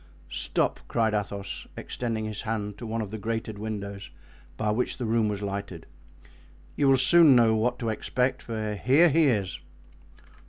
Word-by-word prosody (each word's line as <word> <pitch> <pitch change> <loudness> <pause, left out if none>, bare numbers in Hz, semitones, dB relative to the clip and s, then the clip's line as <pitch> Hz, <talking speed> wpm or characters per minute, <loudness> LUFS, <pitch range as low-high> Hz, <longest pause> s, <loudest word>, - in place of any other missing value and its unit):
"Stop," - - 0
cried 110 -2 +1
Athos, 100 -1 -4
extending 115 -3 -3
his 110 -1 -5
hand 105 -2 -3
to 120 - -6
one 110 0 -2
of 100 - -8
the 110 - -5
grated 110 0 -3
windows 100 -2 -5 0.5
by 105 - 0
which 120 +4 -1
the 125 - -3
room 115 -1 +2
was 105 -1 -3
lighted; 100 -4 -5 0.9
"you 140 - +2
will 135 -1 +6
soon 150 +2 +6
know 115 -2 +5
what 120 +3 0
to 115 -2 -2
expect, 125 +4 -1
for 110 -2 -3
here 135 - +4
he 160 +2 +4
is." 100 -8 0
110 Hz, 165 wpm, -27 LUFS, 105-120 Hz, 0.9 s, will